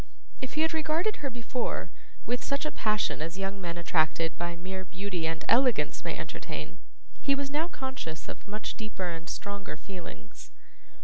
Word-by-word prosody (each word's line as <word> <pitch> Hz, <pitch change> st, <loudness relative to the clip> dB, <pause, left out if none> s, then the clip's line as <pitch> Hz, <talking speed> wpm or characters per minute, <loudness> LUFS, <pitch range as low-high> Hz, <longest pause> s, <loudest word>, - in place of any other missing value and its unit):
If 260 Hz, -, -3 dB
he 310 Hz, -, +4 dB
had 320 Hz, +1 st, +4 dB
regarded 320 Hz, +6 st, +2 dB
her 280 Hz, -, -1 dB
before, 240 Hz, 0 st, -1 dB, 0.3 s
with 245 Hz, +1 st, +1 dB
such 280 Hz, +2 st, +1 dB
a 305 Hz, -, +1 dB
passion 215 Hz, -7 st, +2 dB
as 165 Hz, +4 st, -2 dB
young 195 Hz, 0 st, -1 dB
men 170 Hz, -1 st, -2 dB
attracted 165 Hz, -1 st, +3 dB
by 170 Hz, 0 st, -1 dB
mere 190 Hz, +2 st, -3 dB
beauty 185 Hz, -2 st, -1 dB
and 160 Hz, 0 st, -1 dB
elegance 250 Hz, 0 st, +5 dB
may -, -, -1 dB
entertain, -, -, -4 dB, 0.4 s
he 275 Hz, -, +5 dB
was 275 Hz, 0 st, -1 dB
now 310 Hz, +3 st, +2 dB
conscious 260 Hz, -, -4 dB
of -, -, -7 dB
much 210 Hz, +1 st, -2 dB
deeper 210 Hz, -5 st, -2 dB
and 165 Hz, +1 st, -5 dB
stronger 200 Hz, -6 st, -3 dB
feelings. 175 Hz, -, -8 dB
200 Hz, 170 wpm, -31 LUFS, 170-265 Hz, 0.4 s, elegance